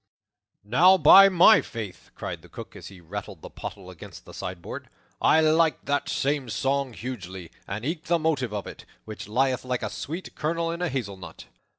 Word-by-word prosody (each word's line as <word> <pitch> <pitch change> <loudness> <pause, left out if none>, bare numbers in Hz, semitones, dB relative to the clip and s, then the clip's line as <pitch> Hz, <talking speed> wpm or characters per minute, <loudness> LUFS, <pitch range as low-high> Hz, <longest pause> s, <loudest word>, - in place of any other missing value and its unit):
"Now, 175 - +5
by 195 +1 +9
my 185 +3 +6
faith," 110 -5 -8
cried - - -6
the - - -17
Cook, - - -10
as - - -10
he 95 -2 -12
rattled 95 0 -8
the - - -9
pottle 95 -2 -8
against 90 - -12
the - - -13
sideboard, 90 -3 -7 0.3
"I 160 - +5
like 160 0 +2
that 145 0 -1
same 140 -2 -1
song 135 +4 -1
hugely, 95 -8 -7 0.2
and 105 +4 -5
eke 155 +1 -3
the 170 0 +2
motive 150 -7 -1
of 105 -2 -4
it, - - -10 0.2
which 110 -2 -8
lieth 130 +4 0
like 125 -1 -3
a - - -3
sweet 165 +6 -6
kernel 165 +2 -2
in 170 +1 -5
a 180 - 0
hazelnut." 100 - -6
130 Hz, 185 wpm, -25 LUFS, 100-160 Hz, 0.3 s, by